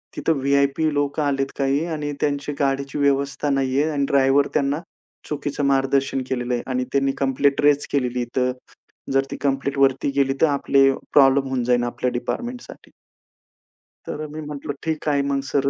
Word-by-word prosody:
तिथं 165 Hz, -, +1 dB
व्हि-आय-पी 140 Hz, +3 st, +2 dB
लोक 145 Hz, +1 st, -1 dB
आलेत 135 Hz, -2 st, -1 dB
काही. 140 Hz, +3 st, +1 dB
आणि 150 Hz, -3 st, -3 dB
त्यांची 145 Hz, 0 st, -1 dB
गाडीची 140 Hz, 0 st, -1 dB
व्यवस्था 140 Hz, +1 st, +1 dB
नाहीये 135 Hz, +2 st, +1 dB
आणि 140 Hz, -2 st, 0 dB
ड्रायव्हर 140 Hz, +1 st, +4 dB
त्यांना 145 Hz, +2 st, +1 dB, 0.5 s
चुकीचं 145 Hz, -1 st, -3 dB
मार्गदर्शन 135 Hz, 0 st, +1 dB
केलेलं 125 Hz, -1 st, -2 dB
आहे 120 Hz, -, -1 dB
आणि 125 Hz, 0 st, 0 dB
त्यांनी 135 Hz, 0 st, +2 dB
कम्प्लेंट 135 Hz, +1 st, +1 dB
रेज 145 Hz, 0 st, +3 dB
केलेली 125 Hz, -3 st, 0 dB
इथं. 125 Hz, +1 st, -1 dB, 0.6 s
जर 135 Hz, 0 st, +3 dB
ती -, -, -4 dB
कम्प्लेंटवरती 135 Hz, 0 st, +1 dB
गेली 135 Hz, -1 st, +2 dB
तर -, -, +7 dB
आपले 140 Hz, -1 st, +3 dB, 0.2 s
प्रॉब्लेम 135 Hz, -1 st, +5 dB
होऊन 130 Hz, -2 st, -1 dB
जाईल 120 Hz, 0 st, +2 dB
आपल्या 120 Hz, +1 st, -2 dB
डिपार्टमेंटसाठी. 240 Hz, -, -5 dB, 1.2 s
तर 155 Hz, -, -4 dB
मी 155 Hz, +1 st, -7 dB
म्हटलं, 145 Hz, -1 st, -5 dB
"ठीक 160 Hz, -1 st, -3 dB
आहे, 140 Hz, -1 st, +2 dB
मग 140 Hz, 0 st, 0 dB
सर 140 Hz, -1 st, +2 dB
140 Hz, 155 wpm, -22 LUFS, 135-145 Hz, 1.2 s, तर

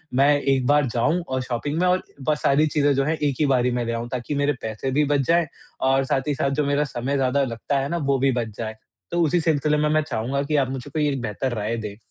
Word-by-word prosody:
मैं 135 Hz, +2 st, +5 dB
एक 135 Hz, -2 st, +1 dB
बार 145 Hz, 0 st, +4 dB
जाऊँ 145 Hz, +9 st, +1 dB
और 130 Hz, 0 st, -1 dB
शॉपिंग 130 Hz, +5 st, -3 dB
में 180 Hz, -, +3 dB
और 180 Hz, +1 st, +2 dB, 0.3 s
बस 150 Hz, -1 st, +1 dB
सारी 145 Hz, +3 st, +4 dB
चीज़ें 145 Hz, -1 st, +2 dB
जो 135 Hz, -, +2 dB
हैं 160 Hz, +2 st, 0 dB
एक 145 Hz, -3 st, 0 dB
ही 155 Hz, -, +3 dB
बार 130 Hz, -3 st, +2 dB
ही 125 Hz, -, +2 dB
मैं 120 Hz, -1 st, -1 dB
ले 115 Hz, -, -2 dB
आऊँ, 115 Hz, +1 st, -3 dB
ताकि 130 Hz, +3 st, -3 dB
मेरे 145 Hz, +1 st, +1 dB
पैसे 110 Hz, +4 st, -3 dB
भी 150 Hz, +3 st, +2 dB
बच 140 Hz, -, +2 dB
जाएँ 170 Hz, 0 st, +3 dB, 0.4 s
और 135 Hz, +1 st, +3 dB
साथ 135 Hz, -, +1 dB
ही 145 Hz, -, 0 dB
साथ 135 Hz, -, 0 dB
जो 145 Hz, +1 st, 0 dB
मेरा 145 Hz, +1 st, +1 dB
समय 130 Hz, +2 st, -3 dB
ज़्यादा 135 Hz, +1 st, +1 dB
लगता 130 Hz, +3 st, -2 dB
है 135 Hz, +1 st, -2 dB
ना, 170 Hz, -, -1 dB
वो 140 Hz, -4 st, +1 dB
भी 135 Hz, +1 st, +3 dB
बच 115 Hz, -4 st, -3 dB
जाए। 110 Hz, -1 st, -4 dB, 0.4 s
तो 175 Hz, -, +1 dB
उसी 165 Hz, +2 st, +2 dB
सिलसिले 150 Hz, -2 st, +1 dB
में 150 Hz, 0 st, +1 dB
मैं 155 Hz, 0 st, +3 dB
चाहूँगा 135 Hz, -1 st, -2 dB
कि 150 Hz, +2 st, -1 dB
आप 135 Hz, -2 st, +1 dB
मुझे 135 Hz, +1 st, -6 dB
कोई 150 Hz, 0 st, +1 dB
एक 135 Hz, -3 st, -2 dB
बेहतर 120 Hz, +3 st, -2 dB
राय 110 Hz, +2 st, -2 dB
दे। 105 Hz, -2 st, -6 dB
135 Hz, 275 wpm, -23 LUFS, 125-150 Hz, 0.4 s, मैं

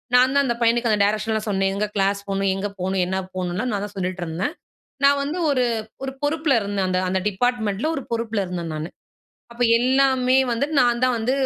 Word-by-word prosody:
நான்தான் 260 Hz, +3 st, +5 dB
அந்த 240 Hz, -2 st, 0 dB
பையனுக்கு, 235 Hz, +1 st, +2 dB
அந்த 210 Hz, -, +2 dB
டைரக்ஷன்லாம் 215 Hz, +1 st, -1 dB
சொன்னேன். 195 Hz, -1 st, +1 dB
எங்க 205 Hz, +1 st, 0 dB
கிளாஸ் 200 Hz, 0 st, +1 dB
போகணும்? 195 Hz, 0 st, 0 dB
எங்க 195 Hz, +1 st, -2 dB
போகணும்? 190 Hz, +1 st, 0 dB
என்ன 190 Hz, +1 st, -2 dB, 0.2 s
போகணும்லாம், 185 Hz, +7 st, -2 dB
நான் 200 Hz, -1 st, -2 dB
தான் 205 Hz, -, -10 dB
சொல்லிட்டு 185 Hz, -1 st, -3 dB
இருந்தேன். 175 Hz, -, -3 dB, 0.5 s
நான் 280 Hz, 0 st, +5 dB
வந்து 300 Hz, +5 st, -3 dB
ஒரு 255 Hz, -3 st, +2 dB, 0.4 s
ஒரு 270 Hz, -, -3 dB
பொறுப்புல 305 Hz, 0 st, +1 dB
இருந்தேன், 200 Hz, -2 st, -1 dB
அந்த 185 Hz, 0 st, +1 dB
அந்த 190 Hz, +1 st, +1 dB
டிப்பார்ட்மெண்ட்டுல, 220 Hz, +3 st, 0 dB
ஒரு 275 Hz, -, -4 dB
பொறுப்புல 225 Hz, -2 st, -1 dB
இருந்தேன் 175 Hz, -2 st, -4 dB
நானு. 155 Hz, +2 st, -4 dB, 0.6 s
அப்போ, 240 Hz, +1 st, -3 dB, 0.2 s
எல்லாமே 260 Hz, 0 st, +3 dB, 0.2 s
வந்து 235 Hz, +5 st, 0 dB
நான் 240 Hz, -1 st, +2 dB
தான் 255 Hz, -1 st, +2 dB
வந்து 225 Hz, +3 st, 0 dB
220 Hz, 190 wpm, -22 LUFS, 195-255 Hz, 0.6 s, நான்தான்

